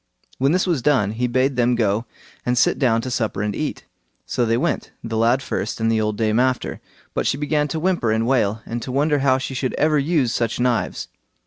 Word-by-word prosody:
When 135 Hz, +2 st, +3 dB
this 185 Hz, +2 st, +2 dB
was 170 Hz, -8 st, 0 dB
done, 120 Hz, -7 st, +2 dB
he 120 Hz, +3 st, -1 dB
bade 130 Hz, +2 st, +1 dB
them 120 Hz, 0 st, +3 dB
go 110 Hz, 0 st, 0 dB, 0.4 s
and 125 Hz, 0 st, 0 dB
sit 125 Hz, -, +3 dB
down 115 Hz, -5 st, +2 dB
to 130 Hz, -, -5 dB
supper 110 Hz, -4 st, -1 dB
and 105 Hz, -1 st, -2 dB
eat. -, -, -4 dB, 0.4 s
So 120 Hz, -, 0 dB
they 115 Hz, +1 st, +2 dB
went, -, -, -1 dB
the 115 Hz, -1 st, -4 dB
lad 120 Hz, +4 st, +2 dB
first 125 Hz, -, -3 dB
and 115 Hz, 0 st, +1 dB
the 110 Hz, -1 st, +2 dB
old 105 Hz, -1 st, -1 dB
dame 110 Hz, 0 st, +1 dB
after, 130 Hz, 0 st, 0 dB, 0.3 s
but -, -, -1 dB
she -, -, +1 dB
began 150 Hz, 0 st, 0 dB
to 160 Hz, -, -3 dB
whimper 170 Hz, -10 st, +1 dB
and 110 Hz, +1 st, +1 dB
wail, 110 Hz, -4 st, +1 dB
and 120 Hz, +1 st, -4 dB
to 130 Hz, -, -5 dB
wonder 145 Hz, +2 st, +2 dB
how 135 Hz, -1 st, +3 dB
she 135 Hz, 0 st, -4 dB
should 130 Hz, 0 st, -2 dB
ever 150 Hz, 0 st, +2 dB
use 140 Hz, -5 st, +1 dB
such 115 Hz, 0 st, -1 dB
knives. 120 Hz, -1 st, 0 dB
125 Hz, 225 wpm, -21 LUFS, 115-135 Hz, 0.4 s, When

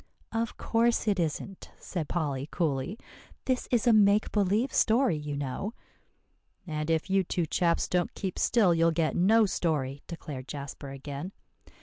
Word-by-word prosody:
"Of 225 Hz, 0 st, -2 dB
course 230 Hz, 0 st, +1 dB
it 200 Hz, -3 st, +2 dB
isn't," 170 Hz, +4 st, -3 dB
said 165 Hz, -5 st, -4 dB
Polly 145 Hz, -4 st, -2 dB
coolly; 160 Hz, +3 st, -1 dB, 0.5 s
"this 255 Hz, -1 st, 0 dB
is 240 Hz, -2 st, +2 dB
a 240 Hz, -, +6 dB
make 210 Hz, 0 st, +4 dB
believe 210 Hz, +5 st, +1 dB
story, 235 Hz, -2 st, +3 dB
you 150 Hz, -1 st, -4 dB
know." 145 Hz, -, -4 dB, 0.9 s
"And 155 Hz, -2 st, -3 dB
if 160 Hz, +2 st, +1 dB
you 195 Hz, 0 st, +4 dB
two 175 Hz, -1 st, -1 dB
chaps 170 Hz, +2 st, +1 dB
don't 180 Hz, -1 st, 0 dB
keep 190 Hz, -3 st, -4 dB
still, 205 Hz, -7 st, +4 dB
you'll 165 Hz, 0 st, +3 dB
get 160 Hz, -1 st, 0 dB
no 215 Hz, +5 st, +5 dB
story," 145 Hz, -7 st, -1 dB
declared 145 Hz, -6 st, -7 dB
Jasper 140 Hz, -1 st, -7 dB
again. 140 Hz, +6 st, -6 dB
175 Hz, 150 wpm, -29 LUFS, 150-210 Hz, 0.9 s, a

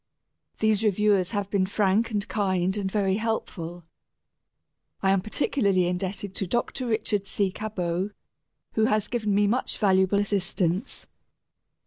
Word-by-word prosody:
These 220 Hz, -1 st, +2 dB
reviewers 205 Hz, -3 st, +3 dB
have 205 Hz, -3 st, -2 dB
been 190 Hz, -2 st, +2 dB
frank 205 Hz, +3 st, +2 dB
and 210 Hz, -2 st, -2 dB
kind 190 Hz, -2 st, 0 dB
and 195 Hz, -2 st, -2 dB
very 195 Hz, -2 st, +1 dB
helpful. 175 Hz, -6 st, -3 dB, 1.2 s
I 190 Hz, -, +4 dB
am 195 Hz, -1 st, +3 dB
particularly 200 Hz, -3 st, +1 dB
indebted 185 Hz, +2 st, -3 dB
to 195 Hz, -, 0 dB
Dr. 240 Hz, +5 st, -1 dB
Richard 215 Hz, -3 st, 0 dB
C. 200 Hz, -2 st, 0 dB
Cabot, 185 Hz, -3 st, -2 dB, 0.6 s
who 220 Hz, -, +3 dB
has 215 Hz, -2 st, +1 dB
given 215 Hz, -4 st, -1 dB
me 205 Hz, 0 st, +4 dB
much 235 Hz, +6 st, 0 dB
valuable 190 Hz, -1 st, +3 dB
assistance. 195 Hz, 0 st, -1 dB
200 Hz, 130 wpm, -26 LUFS, 190-215 Hz, 1.2 s, I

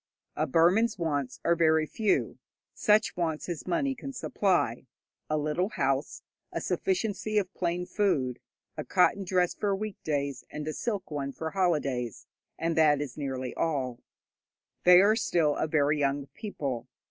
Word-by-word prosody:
A 155 Hz, -, 0 dB
Burman's 185 Hz, -, +3 dB
wants 145 Hz, -7 st, -2 dB
are 170 Hz, -, +4 dB
very 160 Hz, -1 st, +3 dB
few, 215 Hz, +6 st, 0 dB, 0.3 s
such 215 Hz, 0 st, +3 dB
wants 160 Hz, -3 st, -2 dB
as 175 Hz, -2 st, -5 dB
money 270 Hz, +10 st, +1 dB
can 275 Hz, +2 st, -7 dB
supply 180 Hz, -, 0 dB, 0.4 s
a 155 Hz, -, +1 dB
little 155 Hz, +6 st, 0 dB
house, 135 Hz, -8 st, -1 dB, 0.3 s
a -, -, -2 dB
sufficiency 215 Hz, -, -1 dB
of 195 Hz, -2 st, 0 dB
plain 175 Hz, 0 st, -1 dB
food, 165 Hz, -, 0 dB, 0.4 s
a -, -, -4 dB
cotton 195 Hz, +2 st, +3 dB
dress 180 Hz, -1 st, +1 dB
for 200 Hz, -2 st, 0 dB
weekdays 150 Hz, -10 st, -3 dB
and 150 Hz, 0 st, -6 dB
a 155 Hz, -, -2 dB
silk 200 Hz, -5 st, -3 dB
one 140 Hz, -2 st, -3 dB
for 160 Hz, +3 st, -5 dB
holidays, 140 Hz, -, -1 dB, 0.3 s
and 165 Hz, 0 st, -1 dB
that 150 Hz, -3 st, +4 dB
is 145 Hz, -4 st, -5 dB
nearly 130 Hz, -3 st, -4 dB
all. 130 Hz, -7 st, -1 dB, 0.9 s
They 180 Hz, 0 st, +9 dB
are 210 Hz, +2 st, +5 dB
still 165 Hz, -9 st, +1 dB
a -, -, -1 dB
very 150 Hz, -1 st, +2 dB
young 140 Hz, 0 st, 0 dB
people. 140 Hz, -, -4 dB
165 Hz, 150 wpm, -29 LUFS, 145-195 Hz, 0.9 s, They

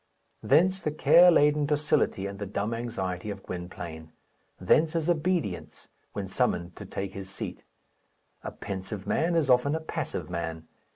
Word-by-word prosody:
Thence 185 Hz, +7 st, +3 dB
the 155 Hz, -, -1 dB
care 170 Hz, +3 st, +6 dB
laden 150 Hz, -3 st, +4 dB
docility 145 Hz, -9 st, +1 dB
and 100 Hz, 0 st, -6 dB
the 100 Hz, -, -4 dB
dumb 105 Hz, +3 st, -2 dB
anxiety 105 Hz, -5 st, -3 dB
of 100 Hz, -1 st, -6 dB
Gwynplaine; 85 Hz, -3 st, -7 dB, 0.5 s
thence 155 Hz, -, +3 dB
his 165 Hz, 0 st, +1 dB
obedience 165 Hz, -, -2 dB, 0.2 s
when -, -, -4 dB
summoned 85 Hz, 0 st, -1 dB
to -, -, -8 dB
take 95 Hz, -1 st, -5 dB
his 95 Hz, -1 st, -7 dB
seat. 95 Hz, -, -6 dB, 0.8 s
A -, -, -3 dB
pensive 95 Hz, +1 st, -6 dB
man 170 Hz, +10 st, +1 dB
is 160 Hz, -4 st, +2 dB
often 130 Hz, +3 st, +4 dB
a -, -, -1 dB
passive 160 Hz, -, -4 dB
man. 80 Hz, -2 st, -4 dB
105 Hz, 155 wpm, -28 LUFS, 95-155 Hz, 0.8 s, care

